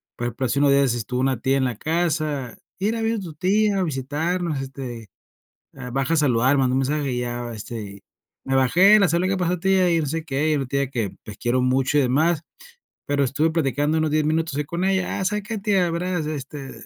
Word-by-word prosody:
Por 120 - -4
ejemplo, 120 +2 -3
hace 130 +4 0
unos 140 -1 +4
días 140 0 +5
es 120 -2 0
estuvo 125 +2 -3
una 130 -3 +1
tía 135 +2 +1
en 135 - +1
la 125 - -2
casa, 155 -5 -1 0.2
"Mira, 225 +4 0
vino 225 -1 0
tu 175 -5 -7
tía 200 +5 +1
a - - +1
visitarnos, 155 +2 -2
este, 130 -4 -7 0.7
eh, 125 -2 -8
baja 135 +4 0
a - - +2
saludar", 130 -2 +3
mandó 130 -1 +2
un - - +2
mensaje 140 0 -1
y 125 - -1
ya, 120 0 -4
este 110 +1 -6
y, 100 -1 -10 0.4
me 135 - -1
bajé, 180 - +6
la 195 - +4
saludé 170 +3 +1
y: - - 0
"¿Qué 195 - +1
pasó 180 0 0
tia?", 190 0 +3
y 165 - +3
no 150 - -2
sé 160 +3 -3
qué, 150 +1 0
y - - +2
una 135 -2 -2
tía 140 -1 -1
que, 115 -7 -3
pues, 105 -1 -10
quiero 125 +1 +1
mucho 130 +2 +1
y - - +5
demás, 150 +5 +2 0.6
pero 140 0 +1
estuve 145 +5 +1
platicando 150 0 0
unos 155 -1 +1
10 155 0 +1
minutos 160 0 0
ahí 150 - -1
con 170 +5 -3
ella. 190 -1 0
"Ah, - - -1
¿sabe 210 +3 -1
qué 220 +2 -4
tia? 195 -4 +1
Veras, 170 -1 -2
este, 140 -2 -6
145 Hz, 235 wpm, -23 LUFS, 130-170 Hz, 0.7 s, bajé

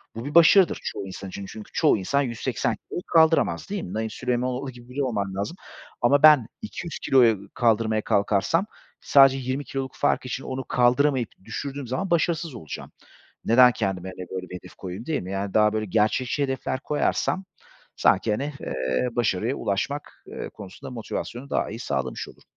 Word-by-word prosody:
bu 115 - -6
bir 145 - -6
başarıdır 170 +2 +6
çoğu 100 - -4
insan 95 +1 -7
için 100 +1 -7
çünkü 110 +2 -10
çoğu - - +4
insan 140 +9 0
180 120 -2 -1
kiloyu 175 - -7
kaldıramaz 160 +2 +3
değil 200 -1 -3
mi? 90 - -7
Naim 110 0 -2
Süleymanoğlu 125 +3 -2
gibi 120 0 -15
biri 140 +2 -2
olman 100 -6 -2
lazım 100 - -3 0.5
ama 140 +5 +4
ben 150 -7 +8
200 175 -6 -6
kiloyu 115 -7 +3
kaldırmaya 110 -2 +2
kalkarsam 105 - +1 0.4
sadece 135 -1 +6
20 130 +2 -3
kiloluk 135 -1 -5
fark - - +1
için 130 +1 -4
onu 130 0 -5
kaldıramayıp 125 0 +2 0.2
düşürdüğüm 140 +3 -5
zaman 130 +10 -2
başarısız 165 -4 +1
olacağım. 80 -10 -8 0.5
Neden 125 +2 +7
kendime, 95 -4 -3
hani, 90 -1 -8
böyle, 95 -1 -5
bir 90 - -7
hedef - - -11
koyayım 95 +5 -7
değil 160 -2 -1
mi? 90 +2 -7
Yani, 100 0 -3
daha, 105 0 +4
böyle, 110 0 -1
gerçekçi 110 +7 +1
hedefler 130 0 -2
koyarsam 155 +5 0 0.5
sanki, 105 +3 +3
hani, 140 +8 -2
eee, 65 - -1
başarıya 115 +1 0
ulaşmak, 140 +9 -3
eee, - - -6
konusunda 100 +5 -10
motivasyonu 120 +2 -5
daha - - 0
iyi 110 +3 -7
sağlamış 65 - -3
olurum. - - -17
120 Hz, 170 wpm, -25 LUFS, 100-140 Hz, 0.5 s, ben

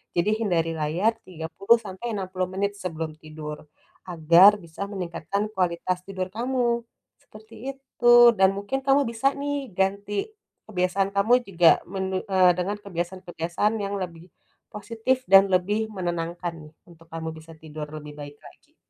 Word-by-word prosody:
Jadi, 175 +5 +2
hindari 165 -4 +1
layar, 165 +9 +1
30 185 +6 +1
sampai 220 +3 -6
60 185 -2 -2
menit 200 +2 -1
sebelum 165 -4 -4
tidur. 155 -1 -9 0.4
Agar, 175 +4 +6
bisa 170 +3 -7
meningkatkan 195 +2 -3
kualitas 180 -1 -1
tidur 185 -1 -4
kamu. 240 0 0 0.4
Seperti 215 +1 -15 0.2
itu. 255 -3 +2 0.2
Dan 190 0 +5
mungkin, 205 +7 -2
kamu 275 +1 +4
bisa 235 +4 +1
nih, 285 -3 -3
ganti 200 +1 -1 0.4
kebiasaan 190 -1 0
kamu 200 +4 +3
juga 175 -3 +5
mene 190 0 -3
eee, 185 -2 +5
dengan 185 +3 -1
kebiasaan-kebiasaan 175 +2 -2
yang 200 0 -3
lebih 170 -1 -7 0.5
positif 230 +5 -1
dan 195 0 +8
lebih 205 +5 +1
menenangkan, 175 -2 -3 0.2
nih, - - -28 0.2
untuk 165 -1 -18
kamu 160 0 -4
bisa 160 +1 -13
tidur 155 -1 -8
lebih 150 -1 -9
baik 145 0 -9
lagi. - - -18
185 Hz, 140 wpm, -25 LUFS, 170-210 Hz, 0.5 s, dan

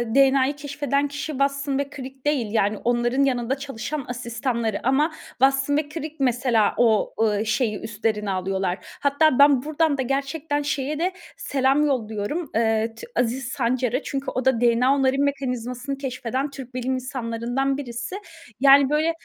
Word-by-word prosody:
DNA'yı 275 0 +4
keşfeden 285 0 -1
kişi 295 +2 -5
Watson 275 0 0
ve 280 - -2
Crick 265 0 -9
değil, 265 -8 0
yani, 215 -1 +1
onların 240 +4 +1
yanında 255 0 0
çalışan 275 +1 -5
asistanları 235 -2 -2
ama 295 +5 +3 0.2
Watson 270 +2 +2
ve 300 -1 -1
Crick 310 0 -6
mesela 245 -4 +2
o, 225 -3 +3
ııı, 215 -1 +2
şeyi 220 -1 0
üstlerine 215 -2 -2
alıyorlar. 190 0 -1 0.2
Hatta 285 -1 +3
ben 280 -3 +6
buradan 310 -1 +1
da - - 0
gerçekten 280 +3 -1
şeye 290 +1 -2
de 365 +2 +1 0.3
selam 275 +2 +2
yolluyorum, 220 0 -1 0.2
ııı, 225 0 +1
T 470 - -10
Aziz 245 +1 0
Sancar'a. 255 0 0
Çünkü 275 0 -3
o 255 +1 -3
da 255 -3 +3
DNA 240 +3 +4
onarım 270 0 +2
mekanizmasını 255 -1 -2
keşfeden 260 +1 -3
Türk 260 -2 -10
bilim 255 +1 -1
insanlarından 255 +1 -2
birisi. 250 +5 -5 0.4
Yani, 275 0 +7
böyle, 305 +2 +2
265 Hz, 150 wpm, -23 LUFS, 235-280 Hz, 0.4 s, Yani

